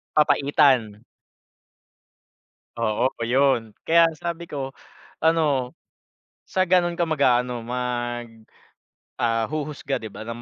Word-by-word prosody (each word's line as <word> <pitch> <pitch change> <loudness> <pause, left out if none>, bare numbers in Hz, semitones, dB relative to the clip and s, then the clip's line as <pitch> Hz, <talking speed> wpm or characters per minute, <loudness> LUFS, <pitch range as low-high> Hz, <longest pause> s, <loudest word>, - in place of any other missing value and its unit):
Papaitan. 135 -7 +3 1.8
Oo, 110 +1 +1 0.3
yun. 135 -1 +4 0.3
Kaya 170 +1 +6 0.2
sabi 170 0 -4
ko 135 -2 -5 0.5
ano, 145 -6 +1 0.8
sa 185 0 +1
ganun 175 -1 +2
ka 170 - +1
mag-aano 125 -6 +1
mag, 120 0 -3 1.0
ah, 115 -1 +1
huhusga 145 -1 -4
'di 110 - -6
ba 110 - -9
ng 115 +1 -6
135 Hz, 100 wpm, -23 LUFS, 120-155 Hz, 1.8 s, Kaya